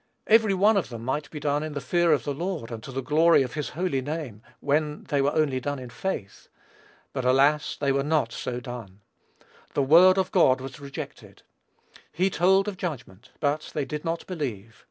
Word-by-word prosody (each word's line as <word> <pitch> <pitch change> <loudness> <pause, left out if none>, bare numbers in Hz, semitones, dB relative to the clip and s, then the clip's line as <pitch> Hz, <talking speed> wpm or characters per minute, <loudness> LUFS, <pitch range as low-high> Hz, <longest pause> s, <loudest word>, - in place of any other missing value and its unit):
Every 220 -3 +4
one 205 +3 +4
of 190 - -1
them 115 -2 -7
might 145 +3 -2
be 150 - -7
done 145 0 0
in 155 -1 -5
the 145 - -3
fear 175 +2 +2
of 150 - +2
the 145 - -2
Lord, 165 -5 -4
and 115 -1 -6
to 135 - -9
the 135 0 -4
glory 155 +2 +4
of 125 - -6
his 150 -1 -3
holy 175 -7 0
name, 145 -6 -5 0.2
were 150 +1 0
they 145 -2 -2
only 145 -1 +1
done 145 +2 -3
in 125 -2 -9
faith. 115 - -5 0.7
But, 130 - -2
alas! 140 +4 +3
they 140 -1 +1
were 140 0 +1
not 145 -5 +1
so 125 -1 -4
done. 115 -6 -9 0.7
The 140 - +2
word 175 +7 +7
of 190 -1 0
God 135 -10 +4
was 135 +3 -8
rejected. 140 -1 -9 0.7
He 185 +3 +1
told 190 +4 +3
of 200 -3 -4
judgment; 125 - -6
but 150 +1 -1
they 145 - 0
did 150 +1 -5
not 165 0 -3
believe. 120 - -5
145 Hz, 195 wpm, -26 LUFS, 130-165 Hz, 0.7 s, word